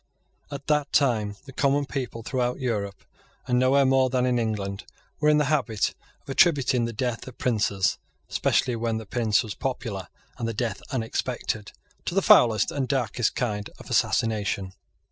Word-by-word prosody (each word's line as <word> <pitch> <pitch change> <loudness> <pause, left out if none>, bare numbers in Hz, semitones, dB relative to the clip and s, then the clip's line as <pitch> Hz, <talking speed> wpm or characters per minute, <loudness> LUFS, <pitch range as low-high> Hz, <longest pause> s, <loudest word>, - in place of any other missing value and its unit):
At 140 -1 -7
that 150 -1 +1
time 110 -7 +2
the 135 - -11
common 140 +2 +2
people 125 -5 -4
throughout 125 +1 -1
Europe, 105 -6 -3 0.4
and 125 0 +2
nowhere 135 +2 +4
more 130 0 +4
than 125 0 +1
in 125 -1 +2
England, 100 -3 -2 0.4
were 150 0 +3
in 150 - +5
the 150 - +3
habit 130 -7 0 0.3
of - - -35
attributing 135 -5 +3
the 115 - -3
death 120 +1 -3
of 130 - -10
princes, 100 -6 +1 0.3
especially 125 - +1
when 115 -1 -1
the 110 - -6
prince 110 0 +1
was 110 -3 -5
popular 110 -8 -4 0.3
and 115 - -1
the 115 - -3
death 115 -3 -2
unexpected, 115 -3 -2 0.3
to 175 - -3
the 195 - +3
foulest 110 -4 +5
and 135 -3 -2
darkest 125 -4 0
kind 105 -4 -2
of - - -12
assassination. 105 -5 0
120 Hz, 165 wpm, -26 LUFS, 110-135 Hz, 0.4 s, in